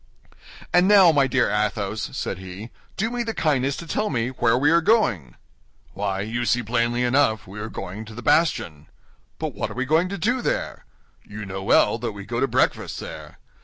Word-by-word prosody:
"And 180 +1 +5
now, 195 -4 +7
my 140 -3 +3
dear 130 - +1
Athos," 105 0 -1
said 95 - -3
he, 95 +5 -9 0.3
"do 220 +4 -1
me 245 0 -2
the 230 -1 -3
kindness 140 -3 0
to 170 - -7
tell 210 +6 -1
me 120 -3 -1
where 125 -2 +1
we 145 +4 +3
are 170 0 +4
going?" 125 - +1 0.6
"Why, 100 -1 -2
you 115 +4 -3
see 120 0 +1
plainly 120 +2 0
enough 125 -3 +2
we 100 +3 -9
are 110 +1 -5
going 100 +2 -7
to 110 0 -11
the 125 - -8
bastion." 85 - +1 0.5
"But - - -4
what - - -3
are - - -9
we 130 +1 -1
going 160 +6 +2
to 200 - -4
do 240 +8 0
there?" - - -3 0.4
"You 105 0 -8
know 95 0 -6
well 95 - +3
that 115 -3 -3
we 100 -1 -9
go - - -3
to - - +2
breakfast - - 0
there." - - -9
120 Hz, 200 wpm, -23 LUFS, 105-165 Hz, 0.6 s, now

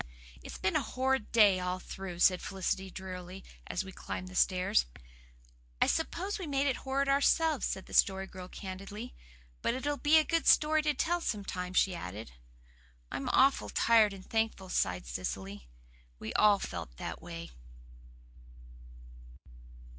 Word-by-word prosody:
"It's - - -8
been 190 - 0
a - - +3
horrid 260 -3 -1
day 205 -5 +6
all 180 0 -2
through," 185 -1 -7
said 185 -1 +5
Felicity 190 0 -2
drearily, 185 0 -8 0.2
as 180 - -2
we 190 - -9
climbed 185 0 -6
the 185 - -11
stairs. 180 - +2 0.9
"I - - +5
suppose 370 +5 -1
we 365 - -5
made 280 -1 +1
it 275 - +1
horrid 275 +1 -1
ourselves," 285 +1 +3
said 190 - -4
the - - -13
Story 190 0 +3
Girl 185 -1 -9
candidly. 195 +6 -8 0.5
"But 235 - 0
it'll 285 +3 -2
be 295 +4 +5
a 315 - +5
good 330 +1 0
story 310 +1 +5
to 300 -1 0
tell 345 +5 0
sometime," 185 - -3
she 190 - +3
added. 110 - -7 0.8
"I'm 135 - -3
awful 270 +1 +3
tired 225 -3 +4
and 195 -1 -11
thankful," 220 -4 -1
sighed 90 - 0
Cecily. 95 +5 -5 0.5
We 110 - -6
all 210 -1 +5
felt 80 - -6
that - - -6
way. 85 -4 -8
195 Hz, 150 wpm, -31 LUFS, 180-270 Hz, 0.9 s, day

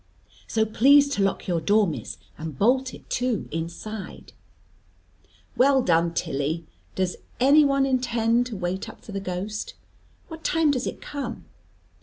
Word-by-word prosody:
So 220 -1 +1
please 280 +6 +5
to 280 - -1
lock 195 -1 0
your 170 -3 0
door, 205 +5 +4
Miss, 165 - -5 0.2
and 155 -3 -7
bolt 255 - +2
it - - -13
too 245 -4 -1
inside." 170 +6 -6 1.2
"Well 265 0 +4
done, 170 -2 +2
Tilly! 150 +4 -2 0.3
Does 185 -1 -1 0.2
any 280 +4 +6
one 275 -1 +3
intend 240 -2 +1
to 225 -5 -6
wait 185 +1 -3
up - - -14
for - - -9
the 200 - -3
ghost? 195 +3 -4 0.5
What 325 -1 -10
time 325 -2 +3
does 260 -2 -1
it - - -6
come?" 275 -5 -6
220 Hz, 150 wpm, -25 LUFS, 180-265 Hz, 1.2 s, any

